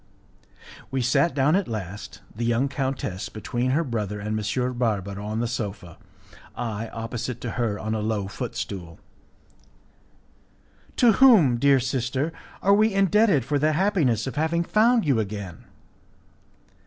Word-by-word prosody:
We 130 -1 -1
sat 130 +5 +2
down 145 +4 +3
at 195 -2 0
last, 105 -2 -6
the 115 - -4
young 120 +3 +1
countess 130 -9 -3
between 120 +3 -3
her 150 +6 +2
brother 105 - -3
and 105 +1 -5
M. 125 +5 -1
Barbaro, 100 -4 -2
on 110 +2 -2
the 120 - 0
sofa, 100 -7 -5 0.6
I, 115 -2 -4
opposite 115 +1 -5
to 120 - -4
her, 115 -4 -1
on 110 +1 -3
a 110 - -1
low 105 -2 -1
foot 100 - -6
stool. 85 -4 -6 2.0
"To 240 -2 +5
whom, 200 - +6
dear 140 +1 +5
sister, 130 +4 -2 0.3
are 200 - +5
we 215 +2 +4
indebted 195 - +3
for 145 +1 0
the 155 +2 +2
happiness 155 - +1
of 135 - -6
having 160 +2 +1
found 225 +3 +3
you 135 -6 +2
again?" 100 -5 -5
125 Hz, 145 wpm, -24 LUFS, 105-150 Hz, 2.0 s, whom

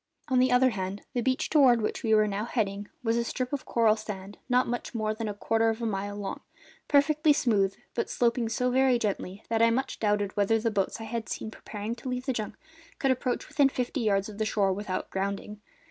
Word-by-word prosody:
On 260 -1 +3
the 255 0 +4
other 250 +1 +5
hand, 195 -1 -4
the 245 - 0
beach 260 +2 0
toward 265 -6 +5
which - - -2
we 225 -4 -1
were 215 -1 +5
now 205 +1 -2
heading 205 -4 -2 0.2
was 230 0 +1
a 235 - +1
strip 250 +2 -3
of 280 - -3
coral 225 -2 +3
sand 205 -2 -7
not 250 +1 +3 0.3
more 215 -1 0
than 220 0 -4
a - - -3
quarter 225 +2 +1
of 225 0 -2
a 235 - -2
mile 205 -1 -2
long, 205 -1 -4 0.5
perfectly 300 +1 +4
smooth, 200 -8 +2 0.2
but 235 - -2
sloping 235 -1 +1
so 250 +3 0
very 260 -1 +4
gently 200 -2 -3
that 225 0 +1
I 230 - +6
much 260 +3 -1
doubted 205 -2 0
whether 205 +2 +3
the 225 +1 0
boats 200 +1 -1
I - - -6
had 225 0 -4
seen 220 - -4
preparing 210 +1 -6
to 260 - -6
leave 250 0 -3
the 265 - 0
junk 215 -3 -4 0.4
could 270 -3 +2
approach 255 0 -1
within 280 -2 +3
fifty 255 +1 -2
yards 200 -3 +1
of 210 -1 -9
the - - +2
shore 200 -3 +2
without 195 -1 -4
grounding. 200 +2 -3
225 Hz, 225 wpm, -28 LUFS, 205-250 Hz, 0.5 s, I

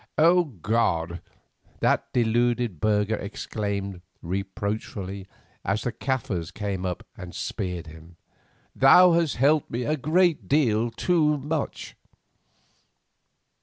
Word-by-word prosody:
"O 175 +3 +5
God!" 95 - -1 0.6
that - - +1
deluded 120 -4 +1
burgher 105 +1 +1
exclaimed, 100 -2 -4 0.2
reproachfully, 100 +1 -4 0.4
as 100 +2 -1
the 120 - -1
Kaffirs 115 -9 -2
came 95 -2 -3
up 90 - -5
and 90 -2 -9
speared 90 -5 -4
him, 80 +2 -13 0.6
"Thou 180 +7 +7
hast 165 -3 +2
helped 145 +4 +2
a 125 +6 0
great 165 +4 +2
deal 120 -6 +2
too 150 +4 +2
much!" 150 +2 -4
110 Hz, 100 wpm, -25 LUFS, 95-140 Hz, 0.6 s, Thou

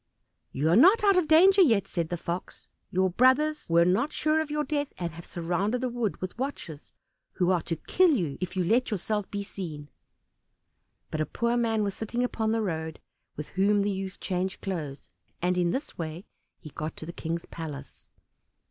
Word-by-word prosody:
"You 145 +4 -1
are 170 - +5
not 375 - +6
out 400 -1 +5
of 365 -2 +3
all - - -13
danger 380 +5 +7
yet," 225 - +4
said 170 -2 -2
the 175 - -2
Fox. 170 +2 -5 0.2
"Your 185 0 +1
brothers 265 - +3
were 170 0 +5
not 230 - +2
sure 310 +1 +1
of 315 - -4
your 300 0 0
death, 290 0 -2
and 170 -1 -3
have 170 +1 -11
surrounded 185 +7 -1
the 255 - 0
wood 235 -4 -2
with 185 +5 -6
watchers, 190 - -5 0.4
who 180 0 +2
are 180 -2 +2
to 165 - -3
kill 365 - +3
you 175 - 0
if 185 0 -4
you 185 - +1
let 230 +8 +2
yourself 210 0 -2
be 200 -1 -3
seen." 155 -7 -7 1.2
But 155 - -1
a 155 - -1
poor 235 0 0
man 225 -3 +1
was 200 -1 -1
sitting 235 +4 -2
upon 220 -3 -1
the 225 0 +1
road, 160 -4 -3 0.4
with 150 - -6
whom 200 +2 +2
the 205 - 0
youth 190 0 -5
changed 185 0 -2
clothes, 155 -8 -5 0.3
and 180 +1 +1
in 175 -1 +2
this 265 - -4
way 165 +3 -5 0.3
he 155 - -11
got 155 +3 -5
to - - -7
the 170 - -7
King's 170 0 -4
palace. 155 -4 -8
195 Hz, 200 wpm, -28 LUFS, 170-245 Hz, 1.2 s, danger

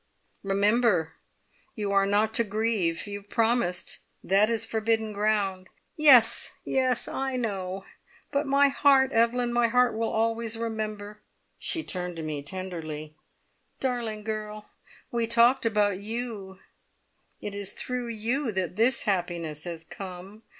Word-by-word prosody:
"Remember 200 -3 +2 0.6
you 205 -3 -2
are 195 0 +3
not 210 +2 +2
to 235 - +3
grieve! 210 -6 -1
You 205 -1 -5
have 205 0 -20
promised. 225 -6 0 0.2
That 200 +4 +3
is 230 -1 -1
forbidden 220 -1 0
ground!" 200 -3 0 0.3
"Yes 255 -7 +6
yes, 255 -2 +1
I 270 -1 -2
know, 195 -5 -3 0.5
but 285 0 0
my 280 +1 +5
heart, 275 -1 +4
Evelyn! 240 +1 +2
My 240 0 +3
heart 250 +1 +3
will 225 0 -1
always 225 0 -1
remember." 215 -2 -4 0.4
She 325 - -1
turned 180 -1 -3
to 165 - -5
me 150 -2 -3
tenderly. 155 -2 -6 0.7
"Darling 235 -5 -2
girl! 215 -1 -5 0.4
we 235 -1 0
talked 235 +2 +4
about 205 -3 +1
you 215 -3 -5 0.8
it 205 - -6
is 200 -1 -4
through 250 -1 -3
you 235 +4 -1
that 185 -1 -2
this 235 +4 +3
happiness 170 -6 -2
has 170 -2 -6
come. 190 +4 -9
215 Hz, 135 wpm, -27 LUFS, 190-235 Hz, 0.8 s, Yes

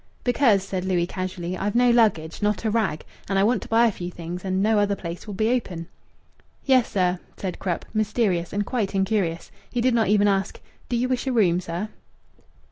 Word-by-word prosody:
"Because," 245 -6 +3
said 190 -1 -3
Louis 180 -2 +1
casually, 185 -1 -4
"I've 200 +3 -2
no 245 0 +5
luggage, 210 -10 +2
not 210 +1 0
a 220 - +2
rag, 210 -9 0 0.2
and 195 - +1
I 195 - +4
want 235 +4 +2
to - - -8
buy 230 +1 +4
a 230 - +3
few 175 -2 -6
things, 175 +1 -7
and 190 -1 -1
no 215 0 +3
other 205 0 +2
place'll 180 +4 -7
be 220 +3 +1
open." 180 -9 -2 0.8
"Yes, 260 -4 +4
sir," 180 -2 +1 0.2
said 185 -2 -4
Krupp, 180 -3 -2
mysterious 210 -5 0
and 205 0 -1
quite 215 -5 -2
incurious. 195 -4 0 0.2
He 245 - -2
did 250 +1 +3
not 230 -2 +2
even 205 0 +4
ask, 195 -1 0 0.3
"Do 240 - 0
you 250 +2 +1
wish 255 +1 -1
a - - +1
room, 185 -7 +3
sir?" 175 +5 -4
200 Hz, 205 wpm, -24 LUFS, 180-225 Hz, 0.8 s, no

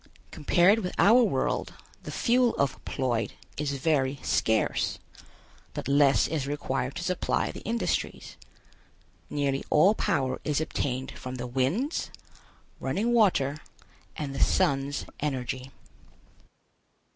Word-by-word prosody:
Compared 180 +8 +4
with 180 -4 -4
our 230 +5 +6
world, 235 - 0 0.3
the - - -7
fuel 245 0 +2
of 140 -1 -1
Ploid 120 -5 -1 0.2
is 145 -1 -2
very 140 -1 +1
scarce, 110 -1 +1 0.8
but - - -4
less 140 0 +4
is 150 -4 -2
required 135 -2 -2
to 180 - -4
supply 180 -1 0
the - - -8
industries. 230 +2 -2 0.9
Nearly 140 -2 -1
all 185 +8 +5
power 130 -10 -1
is 150 -1 0
obtained 130 -4 -2
from 130 0 -7
the 125 -1 -5
winds, 135 - -1 0.7
running 230 +4 0
water 150 - +3 0.6
and 145 -3 -4
the - - -5
sun's 140 0 +1
energy. 130 -2 -3
140 Hz, 115 wpm, -27 LUFS, 130-180 Hz, 0.9 s, our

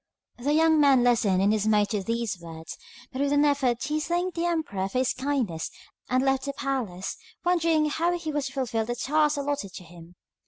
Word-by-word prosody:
The 285 +5 0
young 320 0 +4
man 270 -4 +5
listened 210 -6 +3
in 200 - +4
dismay 210 -1 +3
to 210 -2 0
these 230 0 -2
words, 165 -1 -8 0.4
but 260 - -4
with 285 0 +1
an 290 +1 +4
effort 265 -4 +1
he 305 +1 -1
thanked 350 +3 -1
the 340 +1 0
emperor 250 - -1
for 250 - -3
his 255 0 +2
kindness 255 - -2 0.4
and 255 +1 +2
left 270 0 +1
the 280 - -3
palace, 250 -10 -3 0.3
wondering 330 -3 +3
how 340 +4 0
he 320 -2 -4
was 295 -2 -1
to 270 - -9
fulfil 240 -5 -1
the 240 +2 -3
task 300 +3 +1
allotted 280 -9 -3
to - - -9
him. 170 0 -14
265 Hz, 200 wpm, -26 LUFS, 215-300 Hz, 0.4 s, man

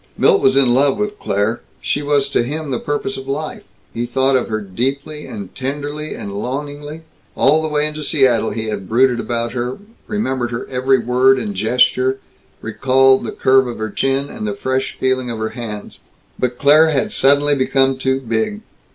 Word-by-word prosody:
Milt - - +4
was 135 0 +3
in 130 -3 +5
love 140 +6 +3
with 210 0 -3
Claire; 100 +4 -1 0.2
she 145 - -1
was 145 -1 +1
to 140 - +1
him 145 +4 -4
the 125 - -1
purpose 145 +7 -3
of 135 0 -8
life; 150 +3 -4 0.3
he 120 +1 -3
thought 130 +2 +2
of 130 - +1
her 110 -1 -2
deeply 135 +9 -4
and 100 -3 -8
tenderly 145 +3 -4
and 100 - -7
longingly. 145 +7 -5 0.3
All 150 +4 +4
the 160 - -2
way 150 -1 +1
into 150 0 -4
Seattle 130 -7 +2
he 110 -1 -4
had 105 -4 -5
brooded 125 +1 +3
about 115 -1 -2
her; 125 +1 -3 0.3
remembered 130 - -2
her 120 0 -4
every 130 +1 +2
word 125 +2 +3
and 110 -5 -3
gesture; 125 +5 +2 0.5
recalled 135 0 +3
the - - -4
curve 130 0 +3
of 120 - -5
her 110 -1 -4
chin, 135 +4 0
and 215 +2 -6
the 205 - -3
fresh 130 -8 -2
feeling 130 -1 0
of 115 - -4
her 110 0 -2
hands. 110 -3 -7 0.4
But 125 -1 -1
Claire 155 +3 +5
had 140 -4 0
suddenly 145 +2 +4
become 135 -1 +1
too 130 0 0
big. 115 - -2
130 Hz, 185 wpm, -18 LUFS, 120-145 Hz, 0.5 s, in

